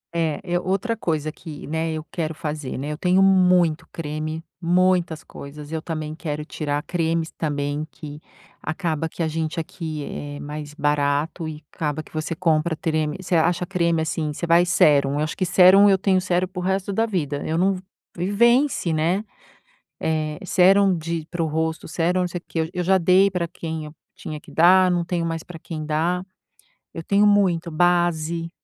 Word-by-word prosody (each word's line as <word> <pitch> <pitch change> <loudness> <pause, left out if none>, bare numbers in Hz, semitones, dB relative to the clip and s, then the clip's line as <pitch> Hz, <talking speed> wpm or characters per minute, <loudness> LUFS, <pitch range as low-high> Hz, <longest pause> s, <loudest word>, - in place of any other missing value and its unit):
É, 160 -3 0
eu 175 -1 -1
outra 195 +5 0
coisa 155 -7 -2
que, 155 -2 -10
né, 160 +2 -2
eu 155 0 -4
quero 160 -2 -3
fazer, 150 -3 -4
né. 140 +3 -4
Eu 150 - -4
tenho 180 +1 +3
muito 180 -4 +4
creme, 155 0 -4 0.2
muitas 175 -2 +2
coisas, 145 +1 -10
eu 160 -1 -2
também 155 -2 -4
quero 150 -2 -5
tirar 145 -2 -3
cremes 165 -1 -1
também, 145 -1 -2
que 150 -1 -10 0.4
acaba 160 -1 -2
que 165 - -4
a - - +1
gente 160 +1 -2
aqui, 160 -2 -5
eh, 145 0 -6
mais 150 0 -7
barato 145 +3 0
e 155 0 -8
acaba 155 0 -2
que - - -20
você 155 +1 -3
compra 160 -1 +1
treme 155 0 -1
você 185 -1 -1
acha 170 +2 +2
creme, 170 -3 +1
assim, 160 -1 -2
você 160 - -4
vai 170 +1 +5
sérum. 145 -6 +4
Eu 145 - 0
acho 155 - -3
que 185 - -1
sérum 190 +3 +7
eu 195 - +5
tenho 190 -1 +2
sérum 180 0 0
pro 180 0 -6
resto 190 +1 -1
da 225 +3 +1
vida, 150 -9 -2
eu 160 - 0
não 190 +3 +3
v 185 - -6 0.4
e 180 +3 -1
vence, 235 - +3
né, 175 +7 0 0.8
eh, 155 -1 -1
sérum 190 +2 +5
de 165 0 -4
para 175 -1 -2
o - - +1
rosto, 160 +1 -2
sérum 175 +2 0
não 180 - 0
sei 175 0 -5
o - - -43
quê, - - -5
eu 160 - -1
eu 180 - -1
já 190 +1 +4
dei 185 +3 +4
pra 175 -2 -2
quem 160 -2 -5
eu 150 - -11 0.2
tinha 155 - -7
que - - -16
dar, 185 +2 +6
não 175 -1 +1
tenho 170 0 -2
mais 165 -1 -3
pra 175 -2 -10
quem 155 -1 -6
dar. 165 +4 0 0.7
Eu 165 - -5
tenho 200 +4 +3
muito, 185 -5 +3
base 170 -1 +1
165 Hz, 195 wpm, -23 LUFS, 155-180 Hz, 0.8 s, sérum